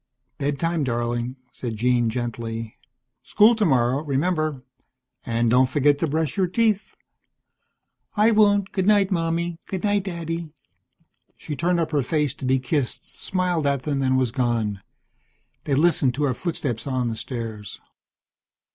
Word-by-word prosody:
"Bed 140 Hz, 0 st, -1 dB
time, 165 Hz, -2 st, 0 dB
darling," 120 Hz, 0 st, -2 dB, 0.2 s
said 120 Hz, -3 st, -5 dB
Jean 120 Hz, +1 st, +2 dB
gently. 115 Hz, -1 st, -4 dB, 0.5 s
"School 215 Hz, +3 st, +5 dB
tomorrow, 135 Hz, -, +2 dB
remember? 155 Hz, -1 st, -1 dB, 0.6 s
And 115 Hz, 0 st, +1 dB
don't 125 Hz, +1 st, +4 dB
forget 145 Hz, +1 st, +3 dB
to 165 Hz, -, +1 dB
brush 155 Hz, +1 st, -1 dB
your 190 Hz, -2 st, +2 dB
teeth." 215 Hz, +1 st, 0 dB, 1.2 s
"I 215 Hz, +2 st, +5 dB
won't. 205 Hz, -2 st, +3 dB
Goodnight, 200 Hz, 0 st, +3 dB
Mommy, 170 Hz, -1 st, -1 dB
goodnight, 200 Hz, +1 st, 0 dB
Daddy." 170 Hz, -2 st, -4 dB, 0.9 s
She 150 Hz, -, -6 dB
turned 175 Hz, +4 st, +1 dB
up 160 Hz, -1 st, -1 dB
her 145 Hz, -2 st, +2 dB
face 150 Hz, +1 st, 0 dB
to 140 Hz, -, -8 dB
be 130 Hz, +1 st, +3 dB
kissed, 130 Hz, 0 st, -3 dB
smiled 180 Hz, -5 st, -1 dB
at 140 Hz, -2 st, 0 dB
them, 140 Hz, -3 st, -1 dB
and 130 Hz, -1 st, +2 dB
was 130 Hz, -3 st, +1 dB
gone. 115 Hz, -5 st, -1 dB, 0.8 s
They 140 Hz, -, +1 dB
listened 145 Hz, -5 st, +3 dB
to 150 Hz, -, -1 dB
her 135 Hz, -3 st, +2 dB
footsteps 130 Hz, -5 st, -3 dB
on 130 Hz, -3 st, 0 dB
the 115 Hz, -, -3 dB
stairs. 110 Hz, -4 st, -6 dB
145 Hz, 140 wpm, -23 LUFS, 125-170 Hz, 1.2 s, School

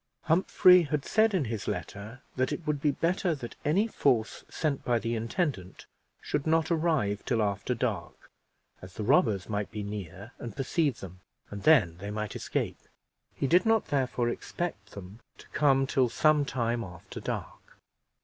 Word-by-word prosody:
Humphrey 180 Hz, +2 st, +5 dB
had 150 Hz, -3 st, -2 dB
said 220 Hz, -1 st, +3 dB
in 165 Hz, -7 st, +1 dB
his 110 Hz, -3 st, -4 dB
letter, 105 Hz, -, -6 dB
that 130 Hz, 0 st, 0 dB
it 170 Hz, -, -4 dB
would 150 Hz, -2 st, -1 dB
be 150 Hz, -, +3 dB
better 170 Hz, +3 st, 0 dB
that 120 Hz, -4 st, -8 dB
any 180 Hz, +9 st, +2 dB
force 125 Hz, -, 0 dB
sent 150 Hz, -4 st, -2 dB
by 120 Hz, -1 st, +2 dB
the 115 Hz, +1 st, -2 dB
intendant 115 Hz, -, -3 dB, 0.3 s
should 145 Hz, -, -3 dB
not 160 Hz, +1 st, +2 dB
arrive 155 Hz, -12 st, +1 dB
till 120 Hz, -, 0 dB
after 105 Hz, +3 st, -1 dB
dark, 110 Hz, -8 st, -4 dB, 0.5 s
as 90 Hz, 0 st, -11 dB
the 110 Hz, -, -4 dB
robbers 100 Hz, -2 st, +3 dB
might 105 Hz, -1 st, -2 dB
be 105 Hz, -2 st, -5 dB
near 100 Hz, +1 st, -7 dB
and 115 Hz, -4 st, -7 dB
perceive 140 Hz, 0 st, 0 dB
them, 95 Hz, -1 st, -9 dB, 0.3 s
and 100 Hz, 0 st, -6 dB
then 105 Hz, -, +4 dB
they 100 Hz, +3 st, -7 dB
might 105 Hz, 0 st, -4 dB
escape; -, -, -3 dB, 0.6 s
he -, -, -2 dB
did 175 Hz, +6 st, +4 dB
not 225 Hz, -1 st, +2 dB
therefore 130 Hz, -3 st, 0 dB
expect 120 Hz, -, -4 dB
them 100 Hz, +2 st, -10 dB, 0.2 s
to -, -, -15 dB
come 135 Hz, -2 st, +3 dB
till 130 Hz, -2 st, +2 dB
some 150 Hz, +3 st, +3 dB
time 120 Hz, -3 st, -1 dB
after 90 Hz, -3 st, -9 dB
dark. -, -, -6 dB
125 Hz, 170 wpm, -29 LUFS, 105-155 Hz, 0.6 s, Humphrey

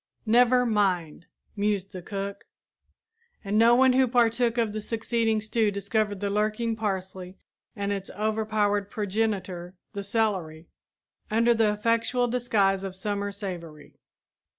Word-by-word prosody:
"Never 245 Hz, +2 st, +4 dB
mind," 185 Hz, -8 st, 0 dB, 0.3 s
mused 200 Hz, -2 st, -1 dB
the 185 Hz, -2 st, -7 dB
cook; 200 Hz, +2 st, -5 dB, 1.0 s
and 200 Hz, 0 st, -2 dB
no 230 Hz, +2 st, +6 dB
one 260 Hz, +1 st, +5 dB
who 260 Hz, 0 st, +4 dB
partook 235 Hz, 0 st, +2 dB
of 225 Hz, -3 st, +1 dB
the 215 Hz, -, -3 dB
succeeding 225 Hz, 0 st, 0 dB
stew 220 Hz, 0 st, +1 dB
discovered 205 Hz, 0 st, -1 dB
the 200 Hz, -, -1 dB
lurking 215 Hz, +2 st, 0 dB
parsley 190 Hz, -3 st, -4 dB, 0.4 s
and 200 Hz, 0 st, -2 dB
its 195 Hz, -1 st, -5 dB
overpowered 210 Hz, -1 st, 0 dB
progenitor, 195 Hz, -4 st, -2 dB, 0.2 s
the 200 Hz, -1 st, -4 dB
celery, 190 Hz, -7 st, -1 dB, 0.6 s
under 230 Hz, +2 st, +3 dB
the 220 Hz, -2 st, +3 dB
effectual 230 Hz, +3 st, +1 dB
disguise 220 Hz, -6 st, +1 dB
of 190 Hz, -1 st, -5 dB
summer 205 Hz, +1 st, -2 dB
savory. 170 Hz, -7 st, -8 dB
210 Hz, 130 wpm, -26 LUFS, 195-225 Hz, 1.0 s, no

